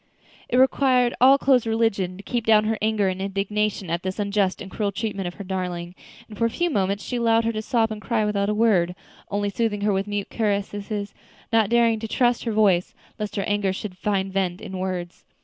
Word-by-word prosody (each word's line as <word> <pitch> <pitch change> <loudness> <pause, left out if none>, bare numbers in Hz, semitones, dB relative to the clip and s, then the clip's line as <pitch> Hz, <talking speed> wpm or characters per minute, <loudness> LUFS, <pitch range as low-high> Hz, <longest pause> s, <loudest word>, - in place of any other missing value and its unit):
It 250 - +1
required 255 -2 +3
all 265 +2 +8
Chloe's 260 -4 +3
religion 210 -5 0
to 200 - -11
keep 240 +1 -2
down 220 -1 +5
her 220 +1 0
anger 215 -2 +1
and 185 0 -2
indignation 200 -1 -1
at 170 +1 -1
this 185 0 -4
unjust 200 -2 0
and 190 - -8
cruel 205 -2 -1
treatment 200 -2 -3
of 175 - -6
her 200 - -7
darling, 180 -2 -4 0.3
and 215 - -11
for 230 - +1
a - - +2
few 345 +9 -1
moments 200 -3 0
she 245 - -3
allowed 230 -1 +3
her 230 - +1
to 215 -1 -3
sob 225 0 +1
and 215 -1 -5
cry 220 -2 0
without 200 -1 0
a - - +1
word, 190 -6 +2 0.3
only 205 0 -1
soothing 210 -1 -1
her 205 0 +2
with 195 +1 -1
mute 205 -1 -3
caresses, 205 -1 -2 0.4
not 220 -3 +4
daring 230 -1 +3
to 225 - -5
trust 245 +2 +1
her 230 - 0
voice, 200 -5 +2 0.2
lest 210 -1 -4
her 200 - -1
anger 205 -1 0
should 190 0 -6
find 195 -1 -1
vent 185 -2 -1
in 190 -4 -7
words. 180 -2 -4
205 Hz, 220 wpm, -24 LUFS, 195-225 Hz, 0.4 s, all